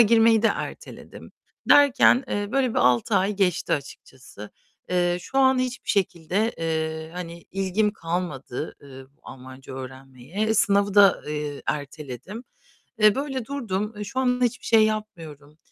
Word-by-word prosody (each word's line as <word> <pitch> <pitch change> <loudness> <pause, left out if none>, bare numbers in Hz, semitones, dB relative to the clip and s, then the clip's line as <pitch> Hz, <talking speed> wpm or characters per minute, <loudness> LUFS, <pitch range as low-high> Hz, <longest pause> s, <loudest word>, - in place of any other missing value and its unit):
girmeyi 225 0 +5
de - - +5
erteledim - - -7 0.4
derken, 275 -2 +6
eee, 205 0 -2
böyle 265 -3 +1
bir - - -1
6 125 -2 +2
ay 195 +3 +1
geçti 185 -4 0
açıkçası. 130 -6 -7 0.4
Eee, 175 -1 +1
şu 270 +9 -3
an 260 -1 +4
hiçbir 255 0 -3
şekilde, 190 +2 0
eee, 160 -1 -3
hani, 170 -1 -7
ilgim 195 +2 0
kalmadı, 165 - -5
ııı, 135 -1 -12
Almanca 130 +1 -11
öğrenmeye. 135 - -5
Sınavı 200 -1 +2
da, 200 -2 +6
eee, 150 -1 -4
erteledim. 150 - -6 0.6
Eee, 215 -1 +5
böyle 270 -4 -3
durdum. 220 -6 -3
Eee, 210 - -4
şu 230 +6 -4
anda 250 -1 +2
hiçbir 240 +1 -4
şey 225 -1 +5
yapmıyorum. 160 -9 -6
190 Hz, 135 wpm, -24 LUFS, 150-225 Hz, 0.6 s, derken